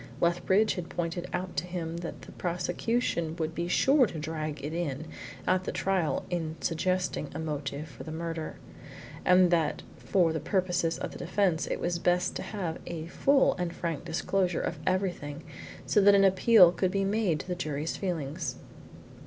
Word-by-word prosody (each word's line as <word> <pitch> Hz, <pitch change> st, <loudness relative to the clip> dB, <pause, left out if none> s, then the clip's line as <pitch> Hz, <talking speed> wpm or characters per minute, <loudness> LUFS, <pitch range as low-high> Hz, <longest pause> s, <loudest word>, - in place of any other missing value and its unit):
Lethbridge 180 Hz, +5 st, +3 dB
had 175 Hz, -3 st, -5 dB
pointed 175 Hz, +1 st, -3 dB
out 180 Hz, +1 st, -3 dB
to 180 Hz, -, -1 dB
him 170 Hz, -2 st, -4 dB
that 170 Hz, -1 st, -6 dB
the -, -, -11 dB
prosecution 175 Hz, 0 st, -1 dB
would 160 Hz, -1 st, -2 dB
be 170 Hz, +1 st, -2 dB
sure 265 Hz, +7 st, +4 dB
to 170 Hz, -, -7 dB
drag 155 Hz, -2 st, -4 dB
it 150 Hz, -, -4 dB
in 155 Hz, -3 st, -2 dB, 0.4 s
at 185 Hz, 0 st, +2 dB
the -, -, -2 dB
trial 190 Hz, -5 st, 0 dB
in 165 Hz, -3 st, -2 dB
suggesting 180 Hz, -2 st, -1 dB
a -, -, -3 dB
motive 150 Hz, -1 st, -4 dB
for 130 Hz, -6 st, -10 dB
the 155 Hz, -, -7 dB
murder, 165 Hz, 0 st, -4 dB, 0.7 s
and 180 Hz, -1 st, +5 dB
that 165 Hz, -3 st, +1 dB
for 175 Hz, -4 st, +2 dB
the 160 Hz, -, -1 dB
purposes 180 Hz, -3 st, 0 dB
of -, -, -4 dB
the -, -, -9 dB
defence 180 Hz, -2 st, +1 dB
it -, -, -2 dB
was 175 Hz, -1 st, -1 dB
best 180 Hz, +1 st, +1 dB
to -, -, -3 dB
have 180 Hz, -6 st, -4 dB
a 160 Hz, -2 st, -4 dB
full 275 Hz, +7 st, +4 dB
and 175 Hz, -1 st, -2 dB
frank 165 Hz, -3 st, -3 dB
disclosure 175 Hz, +2 st, 0 dB
of 160 Hz, -, -3 dB
everything 175 Hz, -6 st, -1 dB, 0.4 s
so 205 Hz, -, +3 dB
that 200 Hz, 0 st, +7 dB
an 195 Hz, -, +5 dB
appeal 190 Hz, -1 st, +7 dB
could 185 Hz, +1 st, 0 dB
be 195 Hz, +1 st, 0 dB
made 195 Hz, -6 st, +1 dB
to -, -, -8 dB
the 180 Hz, -, -1 dB
jury's 155 Hz, -3 st, -3 dB
feelings. 165 Hz, -4 st, -3 dB
175 Hz, 175 wpm, -29 LUFS, 160-185 Hz, 0.7 s, that